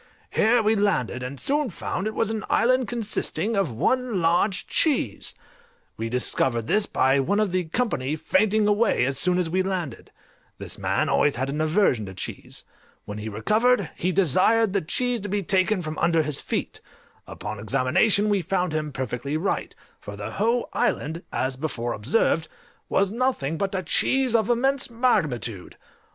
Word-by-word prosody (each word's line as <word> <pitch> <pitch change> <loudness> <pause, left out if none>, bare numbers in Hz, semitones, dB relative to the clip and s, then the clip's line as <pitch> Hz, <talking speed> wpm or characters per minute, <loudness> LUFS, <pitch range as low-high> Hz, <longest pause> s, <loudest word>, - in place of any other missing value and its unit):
Here 225 +1 +3
we 215 +1 +3
landed, 190 - 0
and 130 +2 -6
soon 290 -1 0
found 185 +1 -4
it 215 - -4
was 225 - 0
an 220 -2 -3
island 255 +2 +3
consisting 225 -1 -2
of 195 -9 0
one 245 - 0
large 175 +4 +1
cheese: 305 -4 0 0.6
we 115 +1 -4
discovered 120 -1 0
this 210 - +1
by 135 +1 +2
one 200 +10 +1
of 210 -3 +1
the 180 -1 0
company 160 - -1
fainting 210 +6 +2
away 210 - +2
as 135 0 -1
soon 180 +2 +2
as 180 -2 0
we 185 +3 0
landed: 180 -9 -4 0.5
this - - -8
man - - 0
always 145 - +2
had 130 +3 -2
an 150 +2 -2
aversion 155 - +2
to 95 - -9
cheese; - - -6 0.4
when 105 +1 -6
he 110 +1 -5
recovered, 215 - +1
he 185 - -1
desired 195 - +3
the 200 - +1
cheese 245 +8 -1
to 205 - -5
be 200 0 -1
taken 185 +1 +1
from 155 0 -5
under 165 -2 +3
his 150 -2 -3
feet: - - -4 0.5
upon 105 +3 -6
examination 130 - +2
we 205 -2 +2
found 180 -1 -1
him 155 -1 -2
perfectly 130 +3 -3
right, 185 +5 -2 0.2
for 105 - -8
the 100 0 -6
whole 230 +4 0
island, 170 -9 -1
as 130 0 -1
before 125 -4 -3
observed, 160 - +1 0.4
was 195 0 +2
nothing 235 - -1
but 195 +3 -2
a 185 - -2
cheese 260 +8 +1
of 225 -1 +2
immense 265 +3 +1
magnitude! 150 - -1
185 Hz, 170 wpm, -24 LUFS, 135-220 Hz, 0.6 s, Here